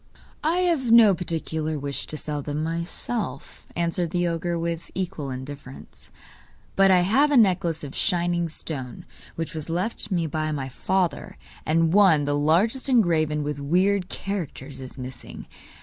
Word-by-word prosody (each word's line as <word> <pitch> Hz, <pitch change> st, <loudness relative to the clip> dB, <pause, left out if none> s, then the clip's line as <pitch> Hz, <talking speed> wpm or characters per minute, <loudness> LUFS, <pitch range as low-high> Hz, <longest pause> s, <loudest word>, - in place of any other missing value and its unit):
'I 320 Hz, +3 st, +2 dB
have 320 Hz, -10 st, +1 dB
no 225 Hz, -4 st, +8 dB
particular 160 Hz, -3 st, -3 dB
wish 140 Hz, 0 st, -3 dB
to 155 Hz, -, -2 dB
sell 150 Hz, -1 st, -4 dB
them 145 Hz, +2 st, -3 dB
myself,' 170 Hz, -, -4 dB
answered 170 Hz, 0 st, -1 dB
the 175 Hz, +1 st, 0 dB
ogre, 170 Hz, +1 st, -1 dB
with 170 Hz, 0 st, -3 dB
equal 175 Hz, -6 st, -3 dB
indifference. 130 Hz, +1 st, -9 dB, 0.7 s
'But 195 Hz, 0 st, +5 dB
I 185 Hz, -1 st, +6 dB
have 260 Hz, +12 st, +3 dB
a 290 Hz, -, +4 dB
necklace 180 Hz, -7 st, +3 dB
of 140 Hz, -1 st, -7 dB
shining 175 Hz, -3 st, +1 dB
stones 135 Hz, -6 st, -5 dB, 0.3 s
which 165 Hz, -2 st, -4 dB
was 155 Hz, 0 st, -6 dB
left 190 Hz, +5 st, -1 dB
me 175 Hz, -4 st, 0 dB
by 155 Hz, -3 st, -2 dB
father, 175 Hz, +3 st, -1 dB, 0.3 s
and 165 Hz, +1 st, +2 dB
one, 190 Hz, -7 st, +5 dB
the 145 Hz, 0 st, 0 dB
largest 175 Hz, -, +2 dB
engraven 160 Hz, -, +2 dB
with 145 Hz, -1 st, -3 dB
weird 180 Hz, +6 st, +1 dB
characters, 150 Hz, -9 st, -5 dB
is 130 Hz, +1 st, -10 dB
missing. 130 Hz, -1 st, -8 dB
165 Hz, 150 wpm, -25 LUFS, 150-190 Hz, 0.7 s, no